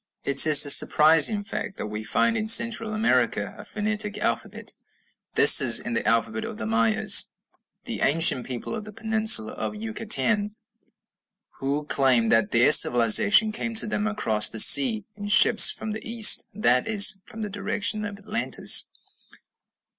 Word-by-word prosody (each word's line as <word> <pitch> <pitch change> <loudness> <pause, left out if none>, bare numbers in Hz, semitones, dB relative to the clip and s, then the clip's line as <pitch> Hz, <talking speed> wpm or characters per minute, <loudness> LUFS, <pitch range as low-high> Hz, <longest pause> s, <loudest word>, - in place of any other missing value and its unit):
It 140 +3 +2
is 150 -1 +6
a 145 - +2
surprising 160 +9 +3
fact 200 -1 -8
that - - -7
we 105 +1 -9
find 230 - -2
in 220 -1 -4
Central 225 -1 +2
America 215 +1 -3
a - - -13
phonetic 210 -1 -6
alphabet. 115 - -5 0.6
This - - +6
is - - +4
in 120 - -7
the - - -3
alphabet 110 -1 -2
of - - -9
the 110 - -8
Mayas, 110 0 0 0.6
the - - -8
ancient 145 -4 +1
people 125 - -8
of 220 -2 -8
the 215 - -12
peninsula 220 - 0
of - - -8
Yucatan, 215 -1 -3 1.0
who 140 +2 -5
claim 130 -6 0
that 115 0 0
their 120 +1 +2
civilization 125 - +4
came 230 +1 -6
to 225 - +1
them 210 0 -5
across 110 - 0
the 110 - -8
sea 220 - +4
in 205 0 -10
ships 215 +1 +4
from 220 - -7
the 215 - -9
east, 230 -1 +2
that 125 -11 -2
is, 210 -2 +2
from 220 - -10
the 210 - -6
direction 205 +1 -3
of 205 -1 -9
Atlantis. 205 +1 -1
205 Hz, 160 wpm, -22 LUFS, -, 1.0 s, is